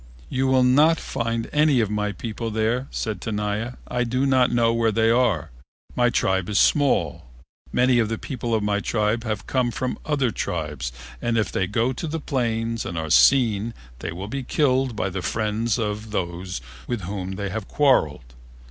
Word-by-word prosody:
"You 130 +1 0
will 130 -1 +4
not 150 +6 +5
find 115 -1 -2
any 150 -3 +4
of 110 -3 +1
my 105 -1 -1
people 115 +3 -5
there," 110 +4 0
said 110 -3 -3
Tenaya; 105 +2 -2
"I 125 0 0
do 125 +3 0
not 130 -2 +3
know 115 -1 +3
where 115 -1 +2
they 115 +1 +3
are. 115 - +1 0.4
My 120 0 +3
tribe 95 -5 0
is 105 - 0
small. 145 - +2 0.4
Many 125 0 +3
of 110 -2 +1
the 115 - -2
people 120 -2 -3
of 110 - 0
my 105 0 +1
tribe 110 +2 0
have 110 -3 -3
come 130 -2 +1
from 125 +2 -3
other 140 -6 +1
tribes 75 - -3 0.3
and 120 -1 0
if 105 - 0
they 95 - 0
go 115 +6 0
to 160 - -5
the 165 +2 -3
plains 115 -5 -1
and 85 - -5
are 80 -1 -3
seen 115 -1 +4 0.2
they - - -4
will 95 +4 -6
be 135 +5 -3
killed 130 -2 +1
by 95 -2 -1
the 95 +1 -3
friends 110 +3 -1
of 110 -1 -3
those 90 -4 -3 0.3
with 120 -4 -2
whom 95 +1 -4
they 100 0 -3
have 105 +1 -5
quarreled. 75 - +2
115 Hz, 185 wpm, -23 LUFS, 105-125 Hz, 0.4 s, not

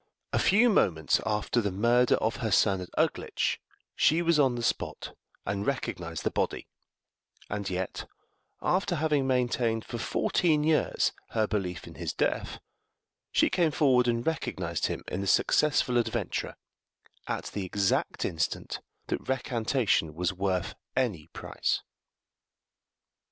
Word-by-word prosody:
A - - +3
few 220 +5 +5
moments 80 - +2
after 105 +3 +1
the 100 -2 -1
murder 120 +5 +3
of 110 +1 -1
her 120 -4 -2
son 95 -1 +3
at 90 - -7
Uglitch, - - 0 0.3
she 165 +3 +3
was 170 -2 +3
on 135 -4 +4
the 120 - -4
spot - - -2 0.3
and 100 0 -2
recognized 85 - -3
the - - 0
body; - - -2 0.8
and 100 -1 -2
yet, 90 0 -3 0.6
after 185 -1 +1
having 150 -3 +1
maintained 120 -3 +1
for 120 - -5
fourteen 155 +5 +1
years 155 0 +2 0.3
her 110 - +4
belief 95 -5 -3
in - - -10
his - - -2
death, - - -1 0.7
she - - +4
came 170 -3 +3
forward 130 -5 +3
and 115 0 0
recognized 90 - -1
him - - -4
in 90 - -3
the 100 - -3
successful 135 +2 +3
adventurer, 120 - -2 0.7
at - - -3
the 100 - -2
exact 100 +1 0
instant 80 -2 -2 0.3
that - - -4
recantation 120 - 0
was 90 +2 0
worth 95 -1 -1 0.2
any 105 -13 0
price. - - -2
115 Hz, 135 wpm, -28 LUFS, 95-135 Hz, 0.8 s, few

